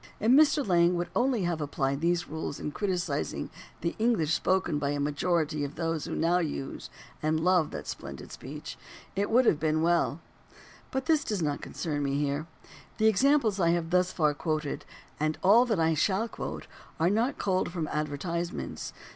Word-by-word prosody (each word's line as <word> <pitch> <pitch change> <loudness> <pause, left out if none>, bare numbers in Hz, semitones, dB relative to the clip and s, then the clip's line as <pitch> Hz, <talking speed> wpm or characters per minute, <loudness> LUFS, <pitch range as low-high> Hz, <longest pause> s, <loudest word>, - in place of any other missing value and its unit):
If 220 +3 +3
Mr. 290 -1 +5
Lang 175 -1 +4
would 175 0 -2
only 245 -5 +2
have 170 -2 -1
applied 140 -1 -1
these 175 +1 +1
rules 160 -2 -5
in 150 - -4
criticising 185 -1 -2 0.3
the 170 - -1
English 215 -10 +2
spoken 175 -3 +1
by 140 -1 -1
a 145 0 -1
majority 150 +1 0
of 145 +1 -5
those 165 -2 -2
who - - -4
now 170 +2 +2
use 150 -5 -4 0.3
and 155 +1 +1
love 175 -1 +3
that - - -6
splendid - - -7
speech, 150 +4 -8 0.4
it 200 +1 0
would 245 +3 +4
have 155 - +4
been 155 0 +1
weU. 170 -3 +2 0.7
But 265 0 -2
this 315 -2 +3
does 205 -6 -2
not 145 -2 -1
concern 150 -4 -3
me 140 0 0
here. 145 +2 -1 0.5
The 220 - +2
examples 220 0 +3
I 170 -2 +3
have 170 -1 -2
thus 180 0 +3
far 150 -5 +2
quoted 155 -1 -3 0.3
and 155 +1 0
all 220 +6 +7
that 220 -7 0
I 160 0 +3
shall 195 +7 +1
quote - - -6 0.3
are 165 +3 +3
not 230 +6 +1
culled 185 -2 0
from 165 -3 -3
advertisements. 170 +4 -3
170 Hz, 180 wpm, -29 LUFS, 150-195 Hz, 0.7 s, all